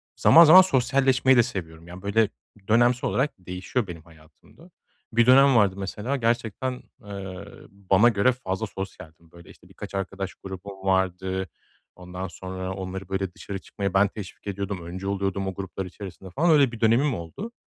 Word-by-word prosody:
zaman 165 - +7
zaman 175 +4 +10
sosyalleşmeyi 130 -4 +3
de 120 - +6
seviyorum. 85 -7 -7
Yani 90 +2 -10
böyle 100 +2 +1 0.4
dönemsel 120 +3 +3
olarak 140 +3 0
değişiyor 90 +5 -3
benim 85 -2 -8
hayatımda. 80 - -20 0.4
Bir 120 +1 +4
dönem 135 +1 +6
vardı 100 -4 +3
mesela 105 +7 -3
gerçekten, 120 +1 -2 0.2
eee, 100 -2 -8 0.2
bana 100 +3 +3
göre 110 +3 +3
fazla 110 -4 -4
sosyaldim, 85 -5 -9
böyle 85 -1 -16
işte - - -18
birkaç - - -9
arkadaş 95 0 -4
grubum 95 0 -10
vardı. 95 0 0 0.5
Ondan 90 +1 -7
sonra 95 +2 -6
onları 95 0 -6
böyle 95 -1 -3
dışarı 100 +2 -7
çıkmaya 100 0 -5
ben 95 +1 +4
teşvik 100 0 -10
ediyordum. 100 -3 -4
Öncü 95 +3 -6
oluyordum 100 -1 -2
o 95 - -3
gruplar 95 0 -6
içerisinde 95 0 -10
falan, 155 - +1
öyle 140 -5 +5
bir 115 - -9
dönemim 120 +5 +3
oldu. 85 - -7
100 Hz, 160 wpm, -25 LUFS, 95-120 Hz, 0.5 s, zaman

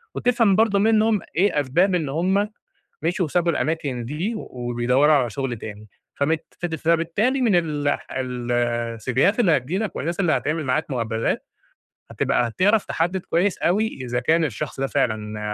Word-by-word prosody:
وتفهم 230 -5 +3
برضه 215 -2 +3
منهم 220 -1 +3
ايه 185 -3 +2
أسباب 175 +8 +2
إن 160 -5 -1
هم 190 +8 +1 0.5
مشيوا 180 +3 +1
وسابوا 175 +2 +1
الأماكن 145 -7 -2
دي 160 - -3
وبيدوروا 125 - +1
على 130 -5 +2
شغل 135 -2 -3
تاني، 105 0 -9 0.3
فبت 155 +3 0 0.3
فبالتالي 170 - +1
من 225 -7 +3
ال 150 -4 0
ال 125 -3 -3
السيفيهات 120 - 0
اللي 175 -10 +4
هتيجي 135 +8 -3
لك 215 -1 -3
والناس 170 +5 -3
اللي 175 -4 +2
هتعمل 155 +1 -1
معاك 140 +4 -1
مقابلات، 115 -3 -1 0.7
هتبقى 120 - +1
هتعرف 200 - +2
تحدد 175 +3 -1
كويس 180 +3 0
أوي 210 +6 +2
إذا 125 -1 -2
كان 160 +6 +2
الشخص 140 +1 -5
ده 135 - 0
فعلًا 110 -6 -1
155 Hz, 150 wpm, -23 LUFS, 125-190 Hz, 0.7 s, اللي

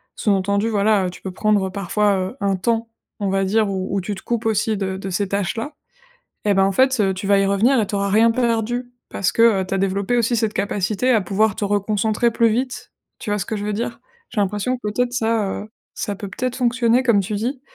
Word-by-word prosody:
sous-entendu, 200 +1 +1
voilà, 205 -2 +2
heu, - - -2
tu 180 - -12
peux 190 - -5
prendre 205 -1 +1
parfois, 200 +2 +1 0.2
heu, 265 - -16
un 200 -1 +1
temps, 230 +4 -1 0.3
on 200 - -1
va 195 0 +1
dire, 210 +2 +2
où 190 0 -3
où 195 - 0
tu 205 +3 -4
te 190 - -10
coupes 235 -1 -2
aussi 220 0 +1
de 190 -1 -3
de 195 0 -6
ces 195 +3 -1
tâches-là. 205 - -2 0.7
Eh, 205 - +3
ben, 195 0 +3
en 195 - +2
fait, 260 +3 +3
heu, 195 -2 +2
tu 190 +1 -5
vas 200 0 +4
y 195 - +2
revenir 220 +7 +3
et 210 - 0
tu 205 - -3
auras 200 0 0
rien 225 +3 +4
perdu 240 +1 -1 0.2
parce 190 - 0
que, - - 0 0.2
heu, - - -3
tu 195 - -3
as - - +1
développé 195 +4 0
aussi 235 +1 +2
cette 220 -2 0
capacité 205 +5 0
à 220 -4 +4
pouvoir 200 +3 +1
te - - -4
reconcentrer 210 +3 +1
plus 230 0 +3
vite. 250 +2 -3 0.3
Tu 220 - -6
vois 210 - 0
ce 180 - -3
que 220 - -3
je 205 - -4
veux 210 - -1
dire? 230 +3 -3 0.3
J'ai 210 - 0
l'impression, 205 +6 -1
peut-être, 240 +3 -1
ça, 225 -5 0
heu, 215 - -13 0.2
ça 205 - -3
peut 200 0 -7
peut-être 250 +6 -3
fonctionner, 245 0 +2
comme 235 -5 +4
tu 205 +2 -4
dis. 250 +5 -3
210 Hz, 240 wpm, -21 LUFS, 195-230 Hz, 0.7 s, vas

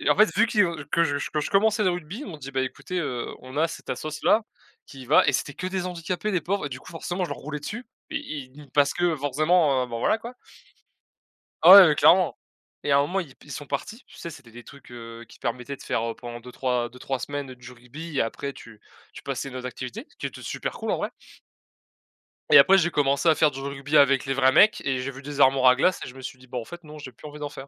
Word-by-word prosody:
Et - - -1
en - - +4
fait, 215 +1 +4
vu 230 +3 +4
qui 215 - +1 0.3
que 170 - +3
je, 145 -3 -1
que 150 - -1
je - - -4
commençais 215 +2 +3
le 185 - +3
rugby, 175 - -5
il - - -7
m'ont 165 -6 -8
dit: 135 -1 -8
«Bah, 135 -1 -1
écoutez, 140 +7 -4
heu, 125 -6 -3
on 130 +2 -11
a 165 +1 +3
cette - - -10
assoce-là, 155 +8 +1 0.5
qui 135 -2 -11
va» 150 - +5
et - - +4
c'était 140 - -1
que 185 - -5
des 185 -1 -3
handicapés, 180 +3 -3
les 180 - +1
pauvres, 195 +4 -2
et - - -3
du 130 - -7
coup, - - -13
forcément, 175 +2 -4
je - - -5
leur - - -5
roulais 150 +1 -6
dessus. 220 - -6 0.3
I 155 - -5
i 150 - -12
parce 145 -1 +3
que, 175 -2 +1
forcément, 145 -1 +2
heu - - -7
bon, 115 -1 -5
voilà, 170 - +2
quoi. 235 +3 -9 1.3
Ah 180 +3 +11
ouais, 150 - +3
clairement. 180 +4 +4 0.5
Et 145 - -1
à 140 - +5
un 140 - +5
moment, 180 +7 -1
ils 145 -7 -9
pe - - -20
ils 150 - -9
sont 145 - -7
partis. 210 - -5
Tu - - -17
sais, 170 - -7
c'était 135 -6 -13
des 120 +1 -12
trucs, 140 -3 -15
heu, 115 -1 -10
qui - - -16
permettaient 125 +3 -4
de - - -14
faire, 115 0 -2
pendant 120 -1 -8
2-3 125 0 -2
2-3 125 +2 -5
semaines, 145 -1 -5
du 125 0 -12
rugby 140 +7 -9
et - - +3
après 140 +4 -4
tu 110 -2 -14 0.3
tu - - -11
passais 140 - -4
à - - -9
une 130 - -8
autre 125 - -6
activité. 130 - -7
Ce - - -27
qui - - -9
était - - -9
super - - -4
cool, - - -4
en - - +1
vrai - - -3 1.4
et 460 - +10
après, 195 0 +7
j'ai 175 -1 +2
commencé 140 +1 +1
à 160 - +6
faire 155 -1 +3
du 135 -1 -8
rugby 140 +2 -2
avec 140 -2 +5
les 135 - -1
vrais 130 0 +4
mecs. 210 +9 +5
Et 135 -1 0
j'ai 130 +2 -3
vu 135 0 -11
des 145 0 -6
armoires 130 -1 +5
à 125 - +3
glace 180 +6 +2
et - - -7
je 125 - -11
me 135 - -11
suis 130 0 -7
dit: 130 - -17
«Bon, 125 - -4
en - - -8
fait 175 +7 -11
non! 150 0 -11
J'ai 130 -3 -9
plus 150 - -13
envie 150 0 -11
d'en 145 -1 -4
faire». 135 -1 -10
145 Hz, 270 wpm, -25 LUFS, 130-175 Hz, 1.4 s, Ah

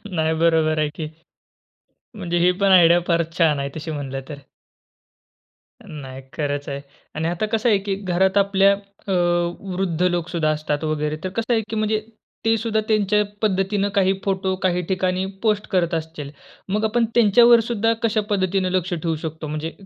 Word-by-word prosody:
नाही 160 0 +1
बरोबर 160 -2 +3
आहे 150 -1 +1
की 155 -2 -4 1.1
म्हणजे 175 -4 -2
ही 180 +1 +4
पण 195 -1 +3
आयडिया 175 -1 +6
फारच 170 -1 0
छान 160 -4 +3
आहे, 140 - -2
तशी 160 +1 -5
म्हणलं 135 -3 -4
तर. 150 - -7 1.5
नाही, 135 -3 -8
खरंच 145 -2 -3
आहे. 140 0 -4 0.3
आणि 160 +1 -1
आता 175 +5 -1
कसं 225 +2 +1
आहे 210 - +4
की 195 - 0 0.2
घरात 190 +2 +2
आपल्या 200 0 +4 0.3
अ, - - -2 0.6
वृद्ध 180 -3 -2
लोकं 175 -1 0
सुद्धा 160 -3 0
असतात 150 0 -2
वगैरे. 155 -1 -1
तर 185 - -2
कसं 230 +1 0
आहे 225 - +2
की 225 - -3
म्हणजे 215 0 0 0.5
ते 225 - +4
सुद्धा 220 0 -1
त्यांच्या 210 -1 +2 0.2
पद्धतीने 200 0 +1
काही 190 -1 +3
फोटो, 190 -1 0
काही 180 -1 +1
ठिकाणी, 185 0 0 0.2
पोस्ट 210 -1 +1
करत 175 -2 +1
असतील. 155 -3 -4 0.4
मग 210 +3 0
आपण 230 +2 +2
त्यांच्यावर 235 +1 +6
सुद्धा 230 -1 +1
कशा 220 -1 +2
पद्धतीने 190 -2 0
लक्ष 180 0 0
ठेवू 165 -1 -2
शकतो? 160 0 -5
म्हणजे 155 +2 -4
180 Hz, 170 wpm, -22 LUFS, 160-205 Hz, 1.5 s, आयडिया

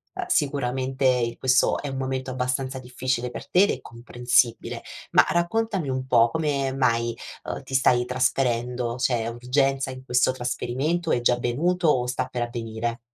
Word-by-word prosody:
uhm, 370 - -3
sicuramente, 130 - 0
questo 130 -1 +3
è 145 - -5
un 135 - -4
momento 130 0 -3
abbastanza 130 +1 -2
difficile 125 -1 -2
per - - -8
te 185 - +5
ed 205 - +3
è - - -4
comprensibile. 120 0 0 0.3
Ma - - +6
raccontami 185 -2 0
un 130 0 -2
po': 115 -2 +5
come 140 -2 -1
mai, 115 -3 +1 0.3
uhm, - - -5
ti 135 - -11
stai 125 -2 +3
trasferendo? 125 -1 0
C'è 120 -3 0
urgenza 135 +3 0
in 130 0 -9
questo 125 0 +2
trasferimento? 130 +6 -2
È 120 - +2
già 120 - +4
avvenuto 160 +9 0
o 125 -5 +3
sta 125 +1 -2
per 125 -1 -4
avvenire? 115 0 -4
130 Hz, 160 wpm, -25 LUFS, 120-135 Hz, 0.3 s, Ma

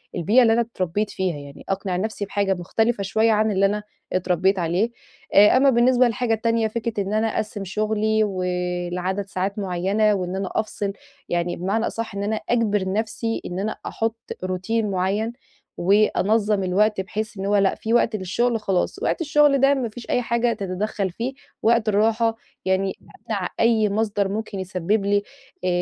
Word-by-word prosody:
البيئة 205 +9 +4
اللي 225 -2 +5
أنا 235 - +3
اتربّيت 205 -2 -2
فيها 185 -4 -2
يعني، 140 0 -11
أقنع 190 -1 -1
نفْسي 210 +1 -2
بحاجة 200 -1 0
مختلفة 205 +5 0
شوية 220 +4 +2
عن 215 0 +2
اللي 195 0 +3
أنا 210 +1 0 0.3
اتربّيت 185 +1 +1
عليه، 175 +7 0 0.4
آآ 210 +5 +7
أمّا 275 +1 +5
بالنسبة 250 0 +4
للحاجة 230 0 0
التانية 230 0 +1
فكرة 220 -2 -2
إن 195 +2 -4
أنا 220 +1 +2
أقسّم 215 -1 -3
شغلي 215 +2 +1
ولعدد 180 0 -2
ساعات 195 +2 -3
معينة 195 +3 +1
وإن 185 -1 -2
أنا 195 -1 -2
أفصِل، 205 -2 -2 0.4
يعني 175 0 0
بمعنى 200 +6 -1
أصح 225 -3 -5
إن 200 - -2
أنا 215 +2 0
أجبر 205 -5 +1
نفْسي 225 +1 -2
إن 180 +1 -4
أنا 215 +2 -2
أحط 225 0 -2 0.3
روتين 190 +4 -1
معيّن، 195 +5 0 0.4
وأنظّم 205 +1 +2
الوقت 200 +2 +2
بحيث 215 +2 -5
إن 195 - -4
هو 205 +1 +2
لأ 195 -1 +3
في 225 +1 -3
وقت 235 -2 +3
للشغل 225 +5 0
خلاص، 195 -3 -1
وقت - - 0
الشغل 295 -2 +4
ده 275 +1 +5
ما 255 -4 -1
فيش 235 +2 -11
أي 245 - +2
حاجة 235 0 +1
تتدخّل 195 0 -2
فيه، 240 +8 -4 0.3
وقت 230 -1 +3
الراحة 225 +2 +2 0.3
يعني 190 0 +1
أمنع 210 -4 -5
أي 225 -2 +3
مصدر 205 -1 0
ممكن 205 -1 -4
يسبّب 190 +3 -1
لي 205 0 +2 0.4
أ 185 - 0
210 Hz, 170 wpm, -23 LUFS, 190-225 Hz, 0.4 s, آآ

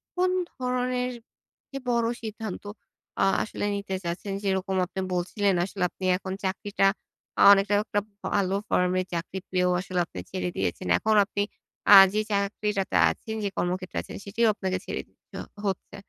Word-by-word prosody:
কোন 365 0 +2 0.2
ধরনের 250 -1 -1 0.6
যে, 275 - -5
বড় 235 -1 +2 0.2
সিদ্ধান্ত 220 -2 -5 0.6
আ - - +5 0.2
আসলে 205 - -4
নিতে 200 -1 -3
চাচ্ছেন? 175 +4 -4
যেইরকম 190 -1 0
আপনি 190 +2 -7
বলছিলেন, 190 +3 +1
আসলে 195 -1 -4
আপনি 185 - -7
এখন 190 0 -5
চাকরিটা 195 +1 +1 0.5
অ - - +4
অনেকটা 200 +1 +4
একটা 205 - 0 0.3
ভালো 195 -1 +1
ফার্মে 180 0 +2
চাকরি 170 +3 -3
পেয়েও 180 -1 +2
আসলে 185 -1 -2
আপনি 95 - -9
ছেড়ে 185 -1 -2
দিয়েছেন। 185 - -2
এখন 220 0 +1
আপনি 205 0 -2 0.5
আ - - +13 0.2
যে 215 - +2
চাকরিটাতে 200 0 -1
আছেন, 220 - -5
যে 200 - 0
কর্মক্ষেত্রে 185 +1 -2
আছেন, - - -9
সেটিও 225 +3 +1
আপনাকে 190 -3 -2
ছেড়ে - - -3
দিতে - - -14 0.3
হচ্ছে। 190 -2 -3
195 Hz, 155 wpm, -26 LUFS, 185-215 Hz, 0.6 s, আ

